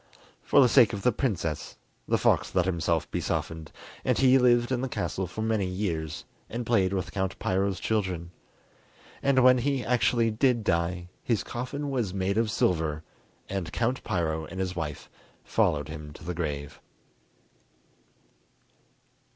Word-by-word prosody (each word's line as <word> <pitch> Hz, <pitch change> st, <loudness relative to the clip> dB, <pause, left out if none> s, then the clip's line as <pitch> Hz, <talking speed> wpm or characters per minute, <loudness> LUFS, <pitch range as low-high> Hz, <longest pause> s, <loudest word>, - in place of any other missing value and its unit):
For -, -, +4 dB
the 130 Hz, -, +7 dB
sake 120 Hz, -2 st, +5 dB
of 100 Hz, -, -4 dB
the 125 Hz, -, +4 dB
princess, 95 Hz, -, -2 dB, 0.3 s
the -, -, +2 dB
fox -, -, +1 dB
let 90 Hz, -2 st, +3 dB
himself 85 Hz, -3 st, 0 dB
be -, -, -1 dB
softened, 80 Hz, -1 st, -3 dB, 0.3 s
and -, -, +1 dB
he 130 Hz, 0 st, +5 dB
lived 120 Hz, 0 st, +4 dB
in 125 Hz, -1 st, 0 dB
the 130 Hz, -, -2 dB
castle 95 Hz, -5 st, -2 dB
for 110 Hz, +5 st, -5 dB
many 110 Hz, -4 st, +1 dB
years, 85 Hz, -5 st, -3 dB, 0.2 s
and 120 Hz, +1 st, -4 dB
played 100 Hz, -6 st, +2 dB
with 95 Hz, -3 st, -2 dB
Count 95 Hz, -1 st, -2 dB
Piro's 95 Hz, 0 st, 0 dB
children. 95 Hz, -6 st, -1 dB, 0.9 s
And 135 Hz, -2 st, +3 dB
when 130 Hz, 0 st, +7 dB
he 135 Hz, 0 st, 0 dB
actually 120 Hz, -1 st, +2 dB
did 120 Hz, +1 st, +2 dB
die, 85 Hz, 0 st, 0 dB
his 115 Hz, -4 st, 0 dB
coffin 140 Hz, +4 st, -4 dB
was 115 Hz, -8 st, -1 dB
made 100 Hz, +2 st, 0 dB
of 115 Hz, -1 st, +1 dB
silver, 80 Hz, -6 st, 0 dB, 0.4 s
and 95 Hz, -4 st, -3 dB
Count 120 Hz, +3 st, -1 dB
Piro 80 Hz, -2 st, -1 dB
and 95 Hz, +4 st, -8 dB
his 95 Hz, -1 st, -2 dB
wife 75 Hz, -4 st, -4 dB, 0.4 s
followed 75 Hz, -1 st, +1 dB
him 75 Hz, -1 st, -8 dB
to -, -, -13 dB
the 90 Hz, +1 st, -3 dB
grave. 75 Hz, -3 st, -4 dB
95 Hz, 155 wpm, -27 LUFS, 85-120 Hz, 0.9 s, the